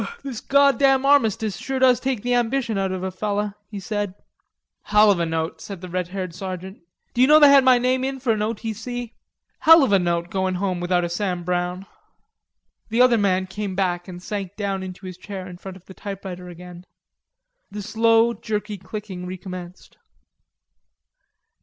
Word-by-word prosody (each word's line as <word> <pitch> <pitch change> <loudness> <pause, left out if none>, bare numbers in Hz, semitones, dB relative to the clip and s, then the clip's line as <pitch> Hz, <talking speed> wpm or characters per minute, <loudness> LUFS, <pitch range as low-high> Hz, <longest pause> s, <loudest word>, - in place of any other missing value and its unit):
"This 265 -5 -6
goddam 275 -1 +4
armistice 225 -7 +2
sure 270 0 -4
does 255 -1 +4
take 260 -5 -2
the 245 0 0
ambition 240 -1 0
out 195 -1 -1
of 185 -1 -4
a 190 - -2
feller," 205 +1 -2 0.2
he 205 -2 -6
said. 205 -1 -3 0.7
"Hell 210 0 +5
of 190 - +1
a 170 - 0
note," 160 0 -3
said 200 -3 -8
the 180 +1 -9
red 180 0 -2
haired 185 -1 -5
sergeant. 185 +1 -7 0.3
"D'you 255 +1 +4
know 305 +1 +7
that 295 - +8
they 280 - +7
had 275 -1 +7
my 255 -1 +6
name 255 +1 +1
in 270 0 -3
for 245 -3 +1
an 215 - -2
O.T.C.? 225 +2 -4 0.5
Hell 325 -1 +7
of 260 - +1
a 195 - +5
note 170 -1 -1
goin' 190 -1 -1
home 185 -1 -1
without 175 0 +1
a - - 0
Sam 180 0 -2
Browne." 180 +1 -2 1.0
The 225 +2 -1
other 240 -2 +4
man 190 -2 +1
came 190 0 -5
back 175 -2 -1
and 180 -1 -9
sank 200 -2 -5
down 200 -2 -2
into 185 0 -8
his 185 -1 -7
chair 190 -1 -7
in 180 -1 -10
front 190 0 -9
of 185 - -21
the 190 - -12
typewriter 190 -3 -7
again. 180 +1 -11 0.8
The 205 0 -6
slow, 225 +2 +3
jerky 210 -2 -4
clicking 190 -3 -7
recommenced. 180 -1 -9
200 Hz, 185 wpm, -23 LUFS, 185-230 Hz, 1.0 s, that